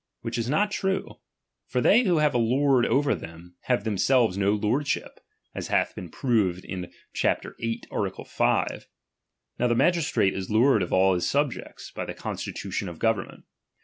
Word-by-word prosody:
WTiich 115 +1 -2
is 115 +1 -2
not 205 +9 +2
true; 190 -1 -2 0.5
for 125 - -1
they 225 - +5
who 175 -4 +3
have 150 -1 +3
a 120 - +2
lord 130 +2 +3
over 145 +1 +2
them, 85 +2 -9
have 125 -1 +1
themselves 110 0 +2
no 100 0 +2
lordship, 115 +7 -1 0.3
as - - -5
hath - - +1
been 90 - -8
proved 100 -8 0 0.5
chap. - - +1 0.2
viii. 115 0 -3
art. - - -3
5. - - 0 0.7
Now 125 - +3
the 120 - +2
magistrate 160 - +2
is 95 -1 -5
lord 110 +1 +4
of 90 - -3
all 95 +1 +4
his 90 -1 0
subjects, 140 -2 -2
by - - -5
the - - -6
constitution 95 - -4
of 85 - -9
government. 110 -2 -1
115 Hz, 165 wpm, -26 LUFS, 95-140 Hz, 0.7 s, they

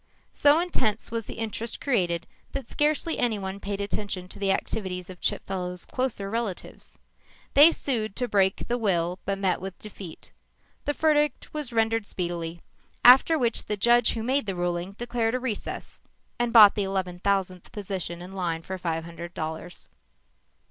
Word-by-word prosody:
So 290 +2 +5
intense 235 - 0
was 230 -2 -3
the - - -6
interest 225 +1 -3
created 175 -10 0 0.3
that 275 -4 -4
scarcely 305 +2 +1
anyone 200 -5 -1
paid 200 0 -4
attention 200 -2 -3
to - - -7
the 195 -1 +2
activities 185 -3 -3
of 180 - -13
Chipfellow's 180 -2 -2
closer 250 -6 -2
relatives. 220 -3 -5 0.6
They 295 +4 +9
sued 220 -10 -1
to 250 - -1
break 195 -3 +1
the 240 +1 0
will 180 -4 0
but 195 0 -1
met 190 -3 0
with 190 -1 -6
defeat. 195 -5 -11 0.5
The 290 - +1
verdict 295 -3 +1
was 300 -5 -4
rendered 225 -1 +1
speedily, 170 -2 -4 0.4
after 265 +6 +8
which 240 -5 0
the 210 - -2
judge 240 +3 +4
who 225 - -3
made 265 0 +1
the 195 - -2
ruling 175 +1 -2
declared 235 +1 -1
a - - 0
recess 245 -4 -5 0.4
and 240 -1 +1
bought 215 -4 +9
the 205 - 0
eleven 190 -2 -2
thousandth 190 -2 -1
position 185 -4 -5
in 185 +2 -10
line 170 -4 -2
for 190 +1 -5
five 165 -2 -2
hundred 170 +1 -9
dollars. 160 +2 -6
200 Hz, 160 wpm, -26 LUFS, 180-235 Hz, 0.6 s, They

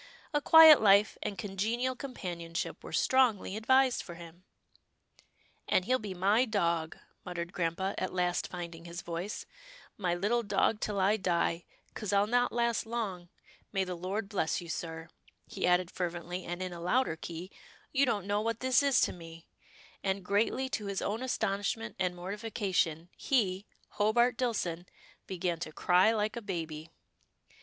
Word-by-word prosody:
A 295 - +2
quiet 320 0 +9
life, 205 0 +5
and 200 - -4
congenial 220 +7 -1
companionship 175 -10 -5
were - - -8
strongly 245 -7 +2
advised 260 +3 +3
for 175 - -9
him." 170 +1 -13 0.6
" - - -34
And 185 - +3
he'll 255 +3 +2
be 205 -3 -6
my 200 +6 +3
dog," 170 -8 0 0.3
muttered 175 0 -5
grampa, 180 +3 -1
at - - -2
last 180 -1 0
finding 170 -2 -7
his 170 +1 -7
voice, 175 +5 -5 0.3
" - - -19
my 180 -4 0
little 210 +7 +1
dog 210 0 +1
till 210 -2 -2
I 200 +3 +3
die, 175 -3 0 0.3
'cause 210 -3 -4
I'll 200 0 +4
not 245 +3 +2
last 235 -1 0
long 200 -7 -4 0.2
— - - -28
May 195 -2 +1
the 185 -1 -4
Lord 190 +5 -3
bless 195 -6 -1
you, 170 -2 -9
sir," 165 0 -5 0.4
he - - -2
added 180 0 +2
fervently, 175 0 -4
and 175 +2 -4
in 185 -1 -5
a 170 - -8
louder 210 0 +1
key, 170 +3 -7 0.2
" - - -27
You 275 -1 +3
don't 205 -5 0
know 205 +1 0
what 230 0 -2
this 260 +1 +3
is 280 -3 +3
to - - +2
me," 165 -1 -12 0.6
and, 195 -1 -1
greatly 220 +7 +1
to 210 -5 -3
his 200 -1 -2
own 215 +4 -2
astonishment 220 -2 -2
and 180 -1 0
mortification, 185 -4 -2
he, 200 -7 0 0.2
Hobart 235 +4 +2
Dillson, 185 -8 -2 0.4
began 180 -3 -2
to 165 -3 -5
cry 180 +6 +4
like 215 0 -1
a 235 - -4
baby. 165 -5 -5
195 Hz, 165 wpm, -31 LUFS, 175-225 Hz, 0.6 s, quiet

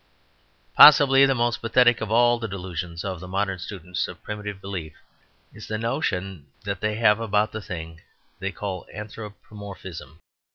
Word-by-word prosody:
Possibly 140 -2 +8
the 135 - +1
most 120 0 0
pathetic 120 0 +3
of 110 - -3
all 120 +1 +4
the 115 - -4
delusions 90 -3 -6
of 95 -3 -4
the 90 - -9
modern 95 0 -2
students 90 -1 -4
of - - -11
primitive 105 -2 -6
belief 95 -6 -6 0.6
is - - -11
the 110 - -3
notion 95 -7 -3 0.2
they 100 +2 -2
have 110 -1 +3
about 105 -1 +1
the 110 - -6
thing 80 -3 -8 0.4
they 95 +1 -3
call 95 -2 -6
anthropomorphism. 100 -6 -9
100 Hz, 150 wpm, -24 LUFS, 90-110 Hz, 0.6 s, Possibly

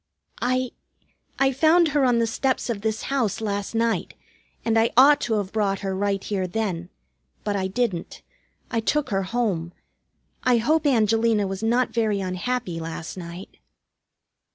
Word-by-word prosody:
"I 255 +1 0 0.7
I 270 0 +3
found 320 +5 +4
her 290 -2 +2
on 245 -2 +3
the 230 - +3
steps 255 +2 -1
of 205 -3 -4
this 220 0 -2
house 255 -8 0
last 205 0 -3
night, 230 0 0 0.5
and 225 -1 +2
I 225 - +3
ought 285 +3 +7
to 225 - 0
have 200 -2 -2
brought 200 -3 0
her 195 -1 -2
right 195 0 -1
here 190 -3 -2
then. 180 -3 -3 0.5
But 205 - -1
I 190 -1 0
didn't. 195 -4 -2 0.5
I 230 - +1
took 295 +5 0
her 195 -1 +1
home. 190 -5 -1 0.7
I 250 -1 +3
hope 300 +7 +2
Angelina 225 -3 +3
was 195 0 -4
not 240 +3 +2
very 220 -3 +1
unhappy 185 0 -2
last 165 0 -6
night." 175 +1 -9
220 Hz, 155 wpm, -24 LUFS, 195-245 Hz, 0.7 s, ought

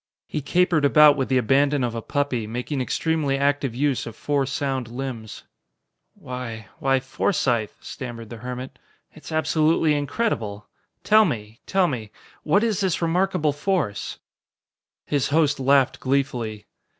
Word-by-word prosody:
He 150 - -3
capered 175 +1 +2
about 150 +1 +7
with 135 -2 -2
the 130 - +3
abandon 135 +3 +2
of 120 -2 -1
a 115 - -4
puppy, 130 -4 -1
making 125 +5 -3
extremely 150 +1 0
active 140 -3 0
use 140 -1 0
of 115 - -8
four 140 +1 0
sound 135 -2 -2
limbs. 120 -3 -6 0.7
"Why 115 -5 -7
why, 135 0 +2
Forsythe," 130 - 0
stammered 120 -3 -8
the 120 - -6
hermit, 125 +2 -7 0.3
"it's 155 - -12
absolutely 155 0 +2
incredible. 135 - -2 0.4
Tell 215 +1 +6
me 110 - -3
tell 190 -1 +3
me 115 -8 -4 0.3
what 185 +8 +2
is 220 -4 +1
this 190 -4 +1
remarkable 170 -2 +1
force?" 145 - -2 0.9
His 145 -3 0
host 145 -1 +2
laughed 135 0 +3
gleefully. 125 -6 -1
135 Hz, 140 wpm, -24 LUFS, 120-150 Hz, 0.9 s, about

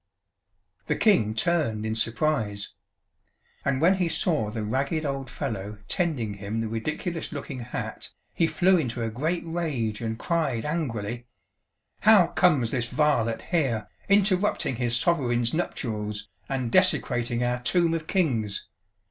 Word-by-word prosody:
"The - - +1
King 110 - +3
turned 115 -8 +1
in 110 - -1
surprise 110 -3 -1 0.9
And 135 -2 +1
when 180 +5 +4
he 180 -3 +1
saw 155 - +1
the 110 0 -4
ragged 135 +8 -1
old 135 -1 -3
fellow 105 -7 -4
tending 145 - -1
him 100 +2 -4
the 115 - -1
ridiculous 155 - -3
looking 140 -3 -6
hat, 120 0 -5 0.2
he 165 - +2
flew 185 +2 +3
into 120 -5 -2
a 115 - -2
great 160 +9 -1
rage 145 -11 -2
and 110 -1 -2
cried 140 -7 -1
angrily: 120 -7 -3 0.7
'How 215 -4 +7
comes 150 -13 +3
this 120 -3 -1
varlet 125 -4 +1
here, 130 - +1 0.2
interrupting 200 - +2
his 120 -1 +1
Sovereign's 120 -5 +1
nuptials 105 -10 -3 0.2
and 130 -3 -2
desecrating 120 -10 +2
our 125 0 0
Tomb 170 +6 +2
of 160 -1 -3
Kings? 120 - 0
130 Hz, 135 wpm, -26 LUFS, 115-165 Hz, 0.9 s, How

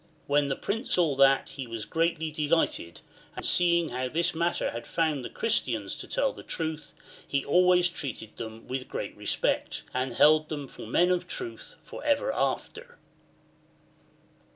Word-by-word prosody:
When 145 0 +2
the 135 - 0
Prince 225 +5 -1
saw 170 -5 +3
that 135 0 +5
he 135 -3 -7
was 115 -2 -5
greatly 165 -1 0
delighted, 150 - 0 0.3
and - - -4
seeing 170 -2 +3
how 125 +1 -2
in 125 - -5
this 170 +2 +1
matter 170 +1 0
he 115 - -5
found 155 -4 -1
the - - -5
Christians 230 - 0
to - - -8
tell - - +1
the - - -10
truth, 160 -2 -4 0.3
he 140 -1 0
always 180 +3 +5
treated 130 -10 -6
them 110 0 -8
Vv'ith 130 0 -4
great - - -5
respect, - - -1
and 130 0 -1
held 155 +4 +5
them 145 -3 -4
for 110 - -10
men 175 +10 +3
of 180 0 0
truth 370 - -7
for - - -9
ever 305 +13 +2
after. 485 +2 -2
155 Hz, 165 wpm, -28 LUFS, 135-180 Hz, 0.3 s, that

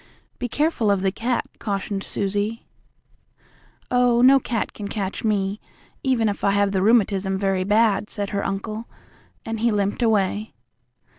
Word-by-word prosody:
"Be 245 - -3
careful 290 -6 +1
of 200 -2 +2
the 190 - +2
cat," 235 +4 -1
cautioned 200 -1 -3
Susie. 205 +3 -2 1.3
"Oh, 245 -1 +4
no 270 +1 +7
cat 235 -3 -3
can 205 - -6
catch 200 -2 -4
me, 205 -2 0 0.4
even 250 -4 +1
if 205 - -3
I - - +4
have 200 0 +2
the 190 -1 0
rheumatism 195 -3 +2
very 195 -1 0
bad," 210 0 +2
said 205 -1 -4
her 200 -1 -1
uncle, 215 +3 -4 0.6
and 225 0 -3
he 235 +2 +2
limped 205 +1 0
away. 215 -1 +1
210 Hz, 150 wpm, -23 LUFS, 195-230 Hz, 1.3 s, no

